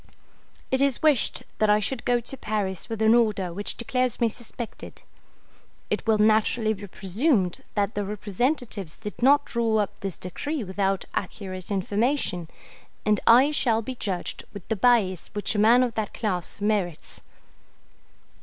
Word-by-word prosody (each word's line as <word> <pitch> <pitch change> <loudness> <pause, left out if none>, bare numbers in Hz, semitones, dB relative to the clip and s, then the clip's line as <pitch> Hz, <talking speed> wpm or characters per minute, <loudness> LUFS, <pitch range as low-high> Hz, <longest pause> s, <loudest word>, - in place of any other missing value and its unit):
It 260 +1 +2
is 275 -1 +1
wished 300 -6 +3 0.2
that 215 - +3
I 210 0 +5
should 235 +3 -3
go 245 -1 +3
to 240 +3 -5
Paris 205 -5 -3
with 225 -1 -2
an 220 +1 +6
order 210 -7 +2
which 205 +3 -1
declares 250 +1 0
me 235 - +3
suspected. 235 0 -8 0.9
It - - -1
will 220 -1 +4
naturally 220 +1 +3
be 205 0 -9
presumed 195 - 0
that 205 +1 0
the 205 - -2
representatives 210 - -2
did 210 0 -8
not 285 +3 +5
draw 230 -2 0
up 205 -1 -1
this 195 -3 -3
decree 285 - -4
without 195 0 -1
accurate 185 -2 -5
information, 200 - -1 0.6
and 210 -1 +3
I 250 +5 +7
shall 230 -6 +1
be 260 - -4
judged 195 -7 -4
with 200 -4 -10
the 225 - +1
bias 200 -5 +2
which 205 0 0
a 210 - -1
man 235 +4 +6
of 245 -2 -1
that 215 -1 -3
class 185 -6 -3
merits. 200 -6 -2
215 Hz, 155 wpm, -25 LUFS, 195-240 Hz, 0.9 s, I